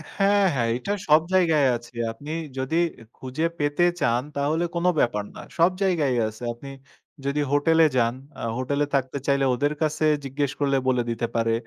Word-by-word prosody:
হ্যাঁ, 200 0 +3
হ্যাঁ 120 -3 0
এইটা 200 +11 -2
সব 155 +1 +6
জায়গায় 160 -7 +4
আছে। 120 +1 -17 0.2
আপনি 145 +7 -9 0.3
যদি 130 +5 -2 0.4
খুঁজে 130 +5 -3
পেতে 145 +4 +2 0.2
চান 120 0 +2
তাহলে 150 +4 0
কোনো 175 +1 +2
ব্যাপার 105 -4 +1
না। - - -8 0.2
সব 170 +3 +5
জায়গায়ই 150 -10 +1
আছে। 110 +3 -9
আপনি 135 +4 -11 0.6
যদি 145 +1 0
হোটেলে 160 +3 +4
যান, 115 0 +2 0.3
আ - - -7 0.2
হোটেলে 140 +3 0
থাকতে 130 +1 -1
চাইলে 140 -1 +2
ওদের 145 +4 0
কাছে 155 0 +1 0.2
জিজ্ঞেস 140 +1 -1
করলে 140 -1 +2
বলে 125 -2 +2
দিতে 115 0 -1
পারে। 115 0 +1
140 Hz, 170 wpm, -24 LUFS, 125-155 Hz, 0.6 s, সব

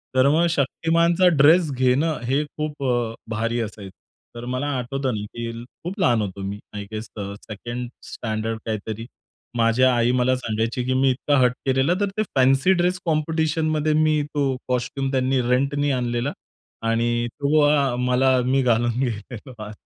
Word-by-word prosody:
तर 130 +1 +5
मग 160 +4 +3
शक्तिमानचा 165 +4 +2
ड्रेस 160 +2 +5
घेणं 130 +5 +1
हे 135 +4 +1
खूप 150 -1 -5
अ, 120 -3 0 0.2
भारी 115 +2 -1
असायचं. 105 -3 -7 0.4
तर 120 0 -7
मला 130 +3 -2
आठवतं 130 +1 -2
ना, 105 - -4
की 115 0 -4 0.3
खूप 185 +5 -5
लहान 120 - +3
होतो 100 -1 -5
मी. 100 +1 -4 0.2
आय 105 - -4
गेस 110 0 -5
सेकंड 110 +4 -6 0.2
स्टँडर्ड 110 0 -3
काहीतरी 110 +1 -4 0.5
माझी 115 +2 +3
आई 120 -2 +4
मला 125 +1 +2
सांगायची, 115 0 -2
की 130 - 0
मी 130 +1 +3
इतका 140 +3 0
हट्ट 125 -1 +3
केलेला. 135 +4 +2
तर 200 - +1
ते 215 - +2
फॅन्सी 135 +7 +4
ड्रेस 180 0 +1
कॉम्पिटिशनमध्ये 155 -1 0
मी 155 0 +3
तो 145 -1 +2 0.2
कॉस्ट्यूम 130 +2 -2
त्यांनी 130 0 +1
रेंटनी 140 +3 +1
आणलेला 125 +1 -1 0.6
आणि 120 +1 +1
तो 150 +1 +1
अ, 140 -4 +2
मला 125 +1 +3
मी 135 +2 +2
घालून 120 -1 +2
गेलेलो. 115 -2 -5
130 Hz, 155 wpm, -23 LUFS, 120-145 Hz, 0.6 s, तर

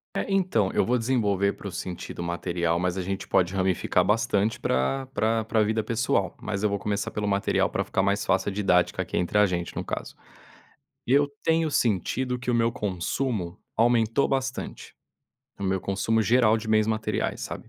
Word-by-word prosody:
É, - - -1
então, 185 - +2
eu - - +2
vou 125 - +2
desenvolver 105 -5 +1
para - - -9
o 95 - -5
sentido 90 -1 -6
material, 85 0 -1
mas 90 +1 -1
a - - -1
gente 95 +1 -4
pode 90 -1 +2
ramificar 95 -1 +1
bastante 110 -1 +1
pra 100 - 0
pra 115 -3 0
pra 110 0 +2
vida 110 +1 0
pessoal. 115 +2 0
Mas 100 - -3
eu 105 - +2
vou 100 - -1
começar 105 0 -2
pelo 105 -1 -3
material, 100 0 +1
pra - - -1
ficar 95 - 0
mais 100 +1 +1
fácil 95 +1 +1
a - - -5
didática 95 -3 +2
aqui - - -3
entre 90 +4 0
a 105 - +6
gente, 85 -2 -3
no - - -3
caso. - - -5 0.9
Eu 140 +3 +4
tenho 160 -1 +2
sentido 125 - 0
que 125 0 -3
o - - +1
meu 115 0 +2
consumo 100 -1 -2 0.2
aumentou 115 +2 +3
bastante, 135 -1 -3 0.6
o 100 - -4
meu 95 0 0
consumo 110 +4 0
geral 115 -1 +4
de 110 0 -6
bens 110 -1 +3
materiais, 110 -1 -1
sabe? - - -7
105 Hz, 185 wpm, -26 LUFS, 95-115 Hz, 0.9 s, a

